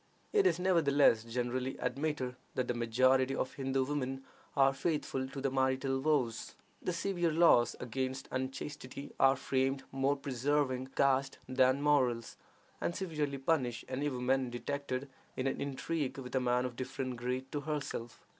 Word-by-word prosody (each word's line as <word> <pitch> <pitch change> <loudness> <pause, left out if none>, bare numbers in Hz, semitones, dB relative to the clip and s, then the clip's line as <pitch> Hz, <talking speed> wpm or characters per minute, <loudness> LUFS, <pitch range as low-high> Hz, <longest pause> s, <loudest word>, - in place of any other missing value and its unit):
It 410 -3 +5
is, - - +2
nevertheless, 145 -10 +4
generally 125 +2 -2
admitted 140 -4 -2 0.2
that 130 -1 0
the - - 0
majority 130 +3 +3
of 130 - -2
Hindoo 135 -1 0
women 135 -2 -2 0.3
are 135 0 +5
faithful 135 -3 -1
to 135 +1 -7
their 135 0 0
marital 130 0 +1
vows. 135 -6 0 0.3
The - - -1
severe 175 -1 0
laws 155 -7 +5
against 130 +2 -3
unchastity 130 +1 -5
are 135 0 +6
framed 135 +1 0
more 135 +1 +1
for 140 - -14
preserving 130 0 0
caste 135 0 +2
than 130 +2 +3
morals, 130 -6 +2 0.5
and 175 - -1
severely 150 -7 -2
punish 135 -4 0
any 140 +3 -1
woman 130 0 0
detected 130 +2 -3 0.3
in 130 - -1
an 135 - -1
intrigue 140 +1 -2
with 125 -2 -7
a 130 - +3
man 125 0 +1
of 125 -2 -4
different 130 0 -4
grade 125 +2 -3
to 145 - -2
herself. 140 -6 -4
135 Hz, 155 wpm, -33 LUFS, 130-145 Hz, 0.5 s, are